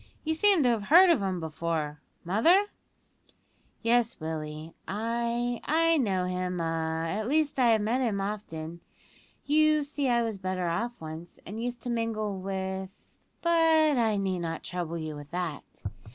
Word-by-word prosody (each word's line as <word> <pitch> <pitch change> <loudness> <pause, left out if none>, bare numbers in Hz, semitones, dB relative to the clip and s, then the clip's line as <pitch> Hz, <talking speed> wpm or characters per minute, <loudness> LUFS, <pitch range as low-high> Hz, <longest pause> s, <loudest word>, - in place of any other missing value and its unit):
You 320 - 0
seem 385 -1 +4
to 250 - +4
have 225 -4 0
heard 355 - +8
of 330 - +3
him 190 -2 -1
before, 160 -2 -3 0.2
mother?" 320 - +4 1.2
"Yes, 235 +1 +2
Willie, 155 0 -5
I 235 +3 -1
I 330 +1 +3
know 195 -9 +1
him 180 0 -2
a 165 0 -1
at 210 +6 -2
least 295 0 +1
I 250 - +5
have 220 -2 +4
met 225 +5 +1
with 255 - +1
him 200 -3 -1
often. 170 -5 -5 0.6
You 305 0 +4
see 285 -2 -2
I 235 -1 +3
was 220 -4 -3
better 185 -1 -2
off 235 +8 -2
once, 160 +2 -9
and 215 +5 -6
used 245 -1 -4
to 245 - -2
mingle 215 -4 -2
with 190 0 -3 0.5
but 325 -3 +4
I 220 -3 +2
need 190 -2 -1
not 165 -1 -4
trouble 170 -2 -4
you 155 -2 -5
with 145 0 -10
that. 170 -4 -5
210 Hz, 165 wpm, -28 LUFS, 170-245 Hz, 1.2 s, heard